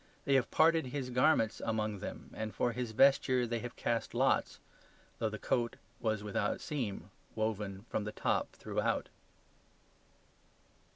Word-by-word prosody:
They 140 - +2
have 135 -3 +3
parted 160 -2 +4
His 125 -1 -4
garments 125 -3 +3
among 110 -2 -1
them, - - -7
and 110 -1 -5
for 120 - +1
His 125 0 -3
vesture 130 +1 +4
they 120 0 -2
have 120 +1 -6
cast 115 -1 -1
lots; - - +2 0.6
though 110 - +1
the 110 - -5
coat 120 +2 0 0.2
was 110 -2 -1
without 105 -1 -1
seam 105 - -4 0.2
woven 105 -2 -2
from 105 - -2
the 105 - -3
top - - 0
throughout. - - -1
115 Hz, 140 wpm, -33 LUFS, 110-125 Hz, 0.6 s, parted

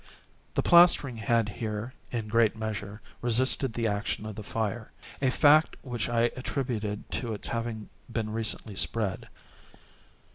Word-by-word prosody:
The - - +1
plastering 170 -8 +6
had 115 0 +1
here, 105 +3 -4 0.2
in 115 -3 -3
great 115 0 +2
measure, 105 -1 -5 0.2
resisted 125 +1 +3
the 115 0 -1
action 105 +1 -2
of 110 -1 -6
the 110 - -6
fire—a 115 +5 -3
fact 150 +4 +5
which 120 -4 -3
I 120 0 +2
attributed 120 -5 -3
to 115 -4 -2
its - - -4
having 115 -2 -3 0.2
been 110 -2 -2
recently 110 -1 -2
spread. 100 -1 -2
115 Hz, 135 wpm, -28 LUFS, 105-120 Hz, 0.2 s, plastering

